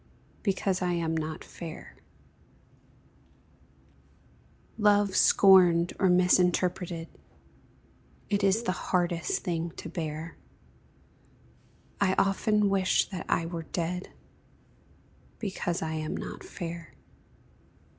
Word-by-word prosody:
Because 195 Hz, -2 st, 0 dB
I 180 Hz, -1 st, 0 dB
am 165 Hz, -1 st, -1 dB
not 160 Hz, 0 st, -4 dB
fair; 165 Hz, -2 st, -9 dB, 2.8 s
Love 205 Hz, -2 st, +3 dB
scorned 180 Hz, -3 st, +5 dB
or 190 Hz, -, +3 dB
misinterpreted 180 Hz, -1 st, +2 dB, 1.2 s
It 200 Hz, -1 st, 0 dB
is 200 Hz, +4 st, +3 dB
the 205 Hz, -, 0 dB
hardest 175 Hz, -2 st, -1 dB
thing 170 Hz, -1 st, -2 dB
to -, -, -8 dB
bear; 160 Hz, -1 st, -5 dB, 1.6 s
I 190 Hz, -1 st, +2 dB
often 210 Hz, +1 st, +2 dB
wish 195 Hz, -1 st, +2 dB
that 185 Hz, -, -6 dB
I 165 Hz, -, +1 dB
were 165 Hz, 0 st, -4 dB
dead, 175 Hz, +2 st, -4 dB, 1.3 s
Because 185 Hz, -5 st, -3 dB
I 160 Hz, -, -3 dB
am 155 Hz, -1 st, -3 dB
not -, -, -7 dB
fair. 170 Hz, -2 st, -7 dB
180 Hz, 95 wpm, -28 LUFS, 165-195 Hz, 2.8 s, scorned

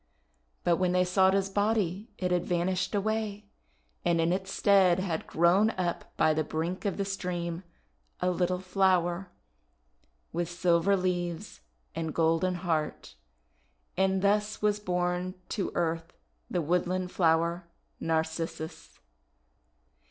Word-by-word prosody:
But 170 Hz, -1 st, +3 dB
when 180 Hz, -1 st, +1 dB
they 180 Hz, 0 st, +4 dB
sought 190 Hz, +1 st, +4 dB
his 195 Hz, -1 st, +1 dB
body 205 Hz, 0 st, 0 dB
it 180 Hz, -1 st, -1 dB
had 175 Hz, -1 st, +2 dB
van 175 Hz, -1 st, +1 dB
ished 185 Hz, +1 st, -1 dB
away, 210 Hz, 0 st, -1 dB, 0.6 s
and 170 Hz, -1 st, +2 dB
in 165 Hz, +2 st, +2 dB
its 190 Hz, +1 st, -3 dB
stead 195 Hz, -4 st, +4 dB
had 180 Hz, -4 st, -2 dB
grown 175 Hz, +6 st, +4 dB
up 175 Hz, -2 st, -3 dB
by 155 Hz, -, +4 dB
the 155 Hz, 0 st, 0 dB
brink 165 Hz, +6 st, -3 dB
of 200 Hz, -, -1 dB
the 200 Hz, -, -1 dB
stream 175 Hz, -3 st, -3 dB, 0.6 s
a 180 Hz, 0 st, +1 dB
little 180 Hz, 0 st, 0 dB
flower, 185 Hz, -1 st, +1 dB, 1.0 s
with 170 Hz, 0 st, -1 dB
silver 175 Hz, +2 st, +2 dB
leaves 175 Hz, 0 st, -3 dB, 0.3 s
and 160 Hz, -1 st, -4 dB
golden 165 Hz, +3 st, +2 dB
heart, 155 Hz, -, -2 dB, 0.4 s
— 65 Hz, -4 st, -42 dB
and 190 Hz, 0 st, +1 dB
thus 210 Hz, +1 st, +1 dB
was 210 Hz, -1 st, +1 dB
born 180 Hz, -1 st, -1 dB
to 200 Hz, -5 st, -2 dB
earth 165 Hz, -1 st, -1 dB, 0.4 s
the 175 Hz, -2 st, -1 dB
woodland 180 Hz, +3 st, 0 dB
flower, 170 Hz, 0 st, +1 dB, 0.3 s
Narcissus. 160 Hz, 0 st, -3 dB
180 Hz, 130 wpm, -29 LUFS, 170-190 Hz, 1.0 s, they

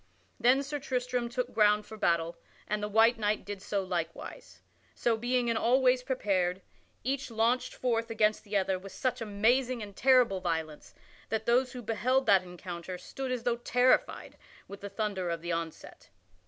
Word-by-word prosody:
Then 260 Hz, +3 st, +4 dB
Sir 290 Hz, +1 st, -4 dB
Tristram 250 Hz, -3 st, -2 dB
took 250 Hz, +1 st, -3 dB
ground 210 Hz, -1 st, +4 dB
for 220 Hz, -, -10 dB
battle, 170 Hz, -4 st, +1 dB, 0.3 s
and 210 Hz, 0 st, -1 dB
the 210 Hz, -, -1 dB
white 225 Hz, +3 st, +4 dB
knight 210 Hz, 0 st, 0 dB
did 205 Hz, -1 st, -6 dB
so 200 Hz, 0 st, -2 dB
likewise. 170 Hz, -3 st, -5 dB, 0.4 s
So 235 Hz, -1 st, +1 dB
being 245 Hz, +2 st, 0 dB
in 230 Hz, -, +1 dB
all 245 Hz, +4 st, +3 dB
ways 255 Hz, -1 st, +3 dB
prepared, 190 Hz, -8 st, -1 dB, 0.4 s
each 270 Hz, +3 st, -2 dB
launched 230 Hz, +2 st, 0 dB
forth 230 Hz, -2 st, -1 dB
against 215 Hz, -1 st, +1 dB
the 205 Hz, 0 st, -1 dB
other 190 Hz, -1 st, 0 dB
with 195 Hz, +1 st, -11 dB
such 250 Hz, -2 st, -2 dB
amazing 235 Hz, +3 st, +1 dB
and 200 Hz, -1 st, -10 dB
terrible 250 Hz, -7 st, +4 dB
violence 160 Hz, -3 st, -4 dB, 0.3 s
that 220 Hz, 0 st, -2 dB
those 250 Hz, +2 st, +2 dB
who 250 Hz, -1 st, -7 dB
beheld 250 Hz, +5 st, +1 dB
that 195 Hz, -2 st, +5 dB
encounter 180 Hz, 0 st, -7 dB
stood 260 Hz, +8 st, -6 dB
as 250 Hz, -2 st, -2 dB
though 240 Hz, -1 st, +1 dB
terrified 245 Hz, +1 st, +1 dB, 0.3 s
with 200 Hz, -, -10 dB
the 200 Hz, -, -6 dB
thunder 200 Hz, -3 st, -2 dB
of 170 Hz, -1 st, -3 dB
the 175 Hz, -, -3 dB
onset. 165 Hz, -1 st, -6 dB
220 Hz, 175 wpm, -30 LUFS, 190-250 Hz, 0.4 s, that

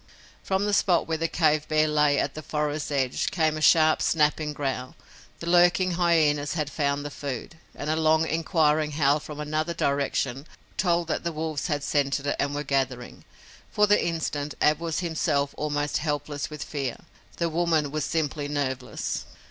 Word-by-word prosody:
From 190 Hz, +1 st, 0 dB
the 205 Hz, -, 0 dB
spot 180 Hz, -4 st, +3 dB
where 160 Hz, -1 st, -1 dB
the 165 Hz, -, +1 dB
cave 155 Hz, -2 st, +1 dB
bear 155 Hz, 0 st, +3 dB
lay 150 Hz, -1 st, +3 dB
at 140 Hz, -, 0 dB
the 155 Hz, -, -7 dB
forest's 150 Hz, -1 st, -2 dB
edge 135 Hz, -3 st, 0 dB
came 160 Hz, -4 st, +1 dB
a 155 Hz, -, -5 dB
sharp, 155 Hz, 0 st, +5 dB
snapping 150 Hz, -1 st, +1 dB
growl. 135 Hz, -3 st, -4 dB, 0.5 s
The -, -, -5 dB
lurking 175 Hz, +1 st, +4 dB
hyenas 160 Hz, -5 st, +2 dB
had 150 Hz, -3 st, -2 dB
found 145 Hz, -1 st, -1 dB
the 145 Hz, -, -5 dB
food, 140 Hz, +3 st, -6 dB, 0.2 s
and 145 Hz, -, -6 dB
a 155 Hz, -, +1 dB
long, 160 Hz, 0 st, +3 dB
inquiring 155 Hz, -2 st, +1 dB
howl 145 Hz, 0 st, +3 dB
from 150 Hz, 0 st, -9 dB
another 155 Hz, +3 st, -2 dB
direction 140 Hz, -1 st, -1 dB, 0.3 s
told 170 Hz, -2 st, +1 dB
that -, -, -1 dB
the 170 Hz, -, -1 dB
wolves 155 Hz, -2 st, -3 dB
had 145 Hz, -4 st, -1 dB
scented 140 Hz, -1 st, 0 dB
it 145 Hz, -, 0 dB
and 145 Hz, 0 st, 0 dB
were 145 Hz, -, -2 dB
gathering. 130 Hz, -4 st, -2 dB, 0.4 s
For 210 Hz, -, +3 dB
the 205 Hz, 0 st, +3 dB
instant 150 Hz, -3 st, -2 dB
Ab 150 Hz, 0 st, +3 dB
was 165 Hz, 0 st, -2 dB
himself 155 Hz, -4 st, 0 dB
almost 145 Hz, -1 st, -1 dB
helpless 145 Hz, -1 st, -3 dB
with 150 Hz, -1 st, -6 dB
fear. 135 Hz, -5 st, -4 dB, 0.4 s
The 170 Hz, -, 0 dB
woman 160 Hz, -3 st, +1 dB
was 155 Hz, -1 st, -2 dB
simply 150 Hz, -2 st, -1 dB
nerveless. 135 Hz, -3 st, -3 dB
150 Hz, 175 wpm, -26 LUFS, 145-160 Hz, 0.5 s, sharp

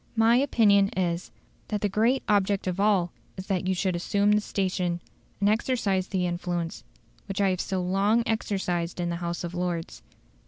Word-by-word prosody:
"My 225 Hz, +1 st, +5 dB
opinion 210 Hz, -7 st, +4 dB
is, 175 Hz, -1 st, -1 dB, 0.4 s
that 210 Hz, -2 st, -2 dB
the 205 Hz, -, +2 dB
great 225 Hz, +7 st, +1 dB
object 200 Hz, -1 st, +2 dB
of 185 Hz, 0 st, -2 dB
all 195 Hz, -4 st, +2 dB, 0.3 s
is 185 Hz, -, -6 dB
that 185 Hz, -2 st, -1 dB
you 190 Hz, -, +1 dB
should 185 Hz, 0 st, 0 dB
assume 200 Hz, +4 st, +1 dB
the 210 Hz, 0 st, +4 dB
station, 185 Hz, -4 st, -1 dB, 0.4 s
and 200 Hz, -, +2 dB
exercise 210 Hz, -4 st, +1 dB
the 185 Hz, -2 st, -1 dB
influence, 175 Hz, -1 st, -3 dB, 0.4 s
which 195 Hz, -1 st, -4 dB
I 200 Hz, -1 st, +3 dB
have 185 Hz, -, -1 dB
so 190 Hz, -2 st, -2 dB
long 200 Hz, +5 st, +2 dB
exercised 185 Hz, -6 st, -2 dB
in 175 Hz, -1 st, -1 dB
the 170 Hz, -, -2 dB
House 170 Hz, 0 st, -3 dB
of 175 Hz, 0 st, -5 dB
Lords. 175 Hz, -2 st, -3 dB
190 Hz, 180 wpm, -27 LUFS, 175-210 Hz, 0.4 s, My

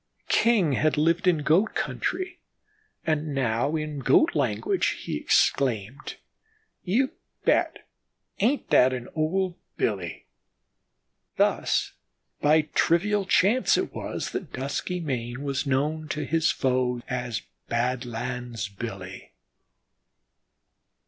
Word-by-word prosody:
King 215 Hz, -10 st, +3 dB
had 155 Hz, +3 st, +1 dB
lived 165 Hz, +4 st, +2 dB
in 165 Hz, -5 st, +3 dB
Goat 175 Hz, +9 st, +3 dB
country, 360 Hz, -1 st, -2 dB, 0.7 s
and 155 Hz, -2 st, -1 dB
now 125 Hz, +3 st, +1 dB
in 155 Hz, -2 st, -3 dB
Goat 310 Hz, -, +4 dB
language 395 Hz, -2 st, 0 dB
he -, -, -3 dB
exclaimed: 125 Hz, +1 st, +1 dB, 0.7 s
"You 245 Hz, +9 st, +1 dB, 0.3 s
bet, -, -, +1 dB, 0.5 s
ain't 250 Hz, +8 st, +1 dB
that 130 Hz, +1 st, +6 dB
an 125 Hz, -1 st, -5 dB
old 175 Hz, +3 st, 0 dB, 0.2 s
Billy?" 95 Hz, -6 st, -2 dB, 1.1 s
Thus -, -, +1 dB, 0.5 s
by 155 Hz, +2 st, +5 dB
trivial 200 Hz, +4 st, +2 dB
chance 220 Hz, +9 st, +4 dB
it -, -, -2 dB
was -, -, -4 dB
that 175 Hz, -, -5 dB
Duskymane 135 Hz, -3 st, -3 dB
was 140 Hz, +1 st, -2 dB
known 150 Hz, +4 st, 0 dB
to 150 Hz, -, -2 dB
his 160 Hz, 0 st, +2 dB
foe, 125 Hz, -2 st, 0 dB
as 125 Hz, -4 st, -3 dB, 0.3 s
'Badlands 120 Hz, -2 st, -2 dB
Billy.' 100 Hz, -2 st, -8 dB
145 Hz, 105 wpm, -26 LUFS, 125-175 Hz, 1.1 s, that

